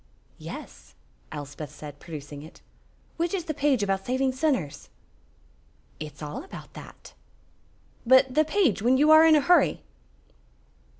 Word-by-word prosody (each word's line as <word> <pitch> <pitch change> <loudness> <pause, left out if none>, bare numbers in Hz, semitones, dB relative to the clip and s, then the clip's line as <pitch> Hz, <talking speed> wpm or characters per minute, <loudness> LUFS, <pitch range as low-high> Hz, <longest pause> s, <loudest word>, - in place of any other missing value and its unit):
"Yes," 60 - -10 0.4
Elspeth 145 0 -7
said, 145 0 -11
producing 145 -3 -9
it. 155 +2 -14 0.6
"Which 340 +3 -1
is 365 - -3
the 310 - -3
page 280 -6 +1
about 195 -1 -1
saving 260 +3 0
sinners?" 255 - -2 1.1
"It's 155 0 -8
all 150 - -6
about 385 - -11
that." - - -13 0.9
"But 260 +1 +5
the 310 +3 +4
page 310 - +1
when 250 +4 +3
you 300 +3 +4
are 315 0 +8
in 320 -1 +6
a 300 - +4
hurry?" 330 +2 +3
260 Hz, 135 wpm, -26 LUFS, -, 1.1 s, are